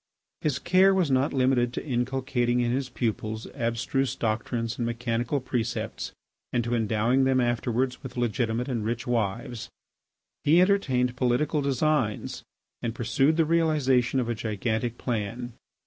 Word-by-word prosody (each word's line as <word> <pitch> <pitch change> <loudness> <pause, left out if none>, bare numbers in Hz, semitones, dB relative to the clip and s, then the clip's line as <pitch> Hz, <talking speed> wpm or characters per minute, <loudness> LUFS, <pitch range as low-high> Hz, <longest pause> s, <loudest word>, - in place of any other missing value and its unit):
His 145 -4 0
care 185 +5 +4
was 175 -7 +2
not 130 +2 +2
limited 130 -2 +2
to - - -4
inculcating 125 -2 0
in 120 -1 +1
his 130 +1 -1
pupils 110 -2 -2
abstruse 120 +3 -1
doctrines 115 +1 -2
and 120 - 0
mechanical 120 +2 -1
precepts 120 -3 -3 0.4
and 120 - +1
to 120 +1 -2
endowing 115 +3 +2
them 130 0 +3
afterwards 120 +1 0
with 130 -2 -8
legitimate 120 0 0
and 120 -5 -2
rich 115 +1 -2
wives. 115 0 -2 0.7
He 160 +4 +5
entertained 135 -11 +2
political 135 +4 +1
designs 140 -4 0 0.4
and 115 -1 -3
pursued 135 +7 +2
the 165 - +4
realisation 145 -6 +2
of 125 - -1
a 120 - 0
gigantic 110 +2 -2
plan. 120 +1 -3
125 Hz, 140 wpm, -27 LUFS, 115-135 Hz, 0.7 s, He